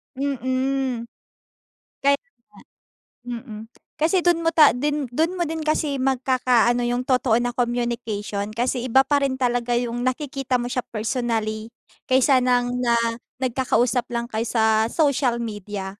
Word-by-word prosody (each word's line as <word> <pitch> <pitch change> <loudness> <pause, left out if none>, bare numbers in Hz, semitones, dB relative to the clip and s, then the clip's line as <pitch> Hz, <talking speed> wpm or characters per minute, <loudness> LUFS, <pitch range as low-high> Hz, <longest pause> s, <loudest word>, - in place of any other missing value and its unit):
Mm. 260 -2 -1 0.9
Kaya 280 +1 +3 1.1
nga, 245 -1 -5
mm, 215 -4 -8 0.4
kasi 340 +3 +2
do'n 345 -1 +3
mo 330 - +2
ta 310 -3 +6
den 290 +2 -1
do'n 330 +7 0
mo 345 - 0
din 320 0 -4
kasi 305 -3 0
magkakaano 255 -2 +2
yung 245 +1 -1
totoo 250 -3 +2
na 245 0 -1
communication 235 -4 -2
kasi 245 +1 -1
iba 265 +3 +5
pa 285 0 +2
rin 265 -1 0
talaga 245 -1 0
yung 240 0 -2
nakikita 260 0 -1
mo 240 - -3
siya 250 0 -1
personally 220 -1 -2 0.4
kaysa 260 0 +4
ng 245 -1 +1
na 235 -1 +2 0.4
nagkakausap 250 -1 0
lang 235 0 -2
kayo 225 -1 -3
sa 220 -1 +2
social 275 -5 +1
media. 205 -3 -5
245 Hz, 140 wpm, -23 LUFS, 235-270 Hz, 1.1 s, ta